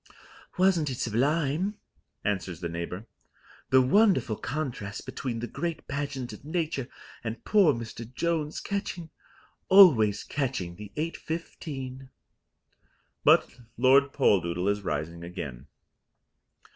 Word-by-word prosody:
"Wasn't 180 -5 +3
it 130 - -4
sublime?" 150 - 0 0.5
answers 95 -5 -2
the 85 -1 -3
neighbour. 85 +5 -5 0.6
"The 130 0 +6
wonderful 195 - +3
contrast 125 -8 -4
between 125 -2 -4
the 120 - -3
great 170 +7 -4
pageant 140 -3 -4
of - - -11
nature 155 -5 -2 0.4
and 115 0 -5
poor 205 -6 +5
Mr. 115 0 -6
Jones, 155 +1 -1
catching 185 -5 -4 0.6
always 120 - +7
catching 125 -11 -3
the 105 -1 -9
8.15." 150 -5 -5 1.1
But 125 - +4 0.2
Lord 135 +3 +5
Poldoodle 90 -3 +2
is 100 0 -3
rising 85 -1 -3
again. 75 -7 -7
130 Hz, 105 wpm, -28 LUFS, 105-155 Hz, 1.1 s, always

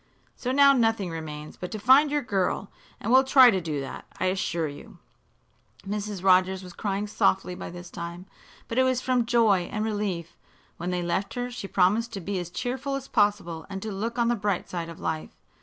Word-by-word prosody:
So 250 - -3
now 280 +1 +6
nothing 225 -7 +1
remains 155 -2 -7
but 180 - -6
to 215 - -5
find 265 +8 +6
your 290 0 0
girl, 195 -2 -1 0.3
and 225 - -2
we'll 260 +1 +7
try 260 -2 +7
to 190 -3 0
do 155 -4 -3
that, 135 - -7
I - - 0
assure 170 -4 -1
you." 145 -1 -11 0.9
Mrs. 205 -2 -4
Rogers 185 0 +4
was 180 -1 -10
crying 200 0 -2
softly 190 -3 +1
by - - -7
this 175 0 -10
time, 170 +2 -7 0.4
but 230 - -1
it - - +6
was 260 -1 +2
from 250 -2 +1
joy 220 -7 +3
and 215 +1 -1
relief. 200 -6 -3 0.4
When 175 +1 -4
they 180 -1 -1
left 190 +5 -2
her 245 0 -3
she 240 -5 -6
promised 205 +6 +2
to 200 - -4
be 195 +1 -3
as 175 -1 -5
cheerful 260 +8 -3
as 275 -1 -5
possible 205 -7 0
and 195 -1 -5
to 220 - -4
look 225 +5 -3
on 235 -1 +2
the 240 - +2
bright 200 -4 -1
side 170 -2 -4
of 165 - -10
life. 160 -1 -4
200 Hz, 205 wpm, -26 LUFS, 175-235 Hz, 0.9 s, we'll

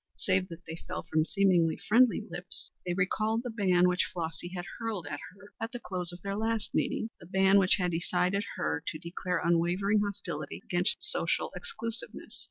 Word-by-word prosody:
Save 185 -1 +1
that 170 +1 -10
they 165 +1 -7
fell - - -4
from 155 0 +1
seemingly 180 -4 +3
friendly 230 0 +4
lips 175 -3 -5
they 175 -1 -1
recalled 215 +5 +1
the 245 - -3
ban 185 -5 +4
which 180 0 +2
Flossy 165 0 -3
had 175 -1 -5
hurled 220 -7 -3
at 145 0 -4 0.2
her 200 +1 -16
at 225 +1 -2
the 245 - -4
close 180 -5 -2
of 175 0 -11
their 200 0 -2
last 225 0 -1
meeting 225 - 0
the 165 - -13
ban 190 +2 +5
which 185 -1 +5
had 180 -2 0
decided 180 +3 +1
her 75 +1 -1
to - - -2
declare 170 +2 -2
unwavering 175 +5 +2
hostility 185 -6 -4
against 180 +1 +1
social 420 - 0
exclusiveness. 245 - -4
185 Hz, 180 wpm, -30 LUFS, 175-205 Hz, 0.2 s, ban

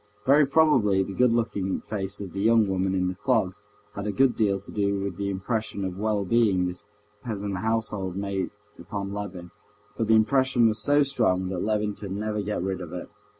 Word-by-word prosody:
Very 140 +2 +5
probably 130 -11 +4
the 95 - -6
good 125 +3 +3
looking 100 -5 -1
face 100 -1 -3
of 95 -4 -7
the 100 - -3
young 110 0 +4
woman 95 0 0
in 90 -1 +1
the 90 - -1
clogs 105 -3 0 0.3
had 100 +1 -5
a - - 0
good 130 +3 +3
deal 100 -3 +1
to 100 - -10
do 100 -1 0
with 100 -2 -3
the 100 0 -2
impression 100 +1 -2
of 95 0 -5
well 105 -2 0
being 100 -4 +3
this 90 +2 -5 0.4
peasant 100 -4 -3
household 105 -3 -2
made 100 -1 -2 0.3
upon 100 +3 -5
Levin, 95 -4 -6 0.4
but 110 0 -1
the 110 - +5
impression 130 +1 +3
was 110 0 0
so 145 +7 +4
strong 115 -10 +1
that 95 -2 -3
Levin 105 -1 0
could 100 -2 -7
never 105 +1 -2
get 105 -3 -2
rid 95 0 -2
of 85 - -7
it. 90 - -7
100 Hz, 200 wpm, -26 LUFS, 95-110 Hz, 0.4 s, Very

